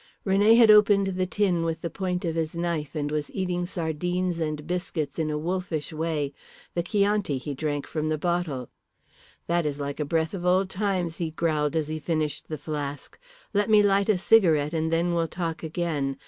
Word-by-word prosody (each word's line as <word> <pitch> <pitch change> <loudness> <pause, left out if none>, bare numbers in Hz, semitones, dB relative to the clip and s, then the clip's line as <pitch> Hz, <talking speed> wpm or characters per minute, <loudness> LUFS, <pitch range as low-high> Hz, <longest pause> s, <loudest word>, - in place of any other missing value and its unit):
René 205 +3 +5
had 230 -3 +8
opened 205 -1 +6
the 185 0 -1
tin 185 -3 +1
with 165 0 -2
the 170 - -3
point 180 -2 -2
of 165 - -1
his 165 0 -2
knife, 170 -3 -2
and 145 -1 -2
was 150 -1 -2
eating 180 -2 -1
sardines 175 +1 -2
and 155 -2 -3
biscuits 175 -4 -3
in 155 -1 0
a 150 - -1
wolfish 170 -1 -3
way. 155 -3 -2 0.4
The 170 - 0
Chianti 200 -4 +1
he 140 +3 -5
drank 145 0 -2
from 155 -1 -2
the 155 - 0
bottle. 165 -6 -2 0.8
"That 170 0 +1
is 145 -1 -2
like 140 +1 -4
a - - +1
breath 160 +3 0
of 185 -3 -5
old 185 +1 +2
times," 185 -4 -1
he 165 -2 -2
growled, 155 -1 0
as 155 -2 0
he 155 0 -3
finished 155 -2 -2
the 155 - -4
flask. 145 - -5 0.3
"Let 205 +1 +1
me 210 -1 +6
light 200 0 +3
a 210 - +4
cigarette 170 -7 +4
and 160 0 0
then 170 +1 +1
we'll 165 -1 +1
talk 165 -1 -4
again. 155 -5 -2
165 Hz, 195 wpm, -26 LUFS, 155-185 Hz, 0.8 s, had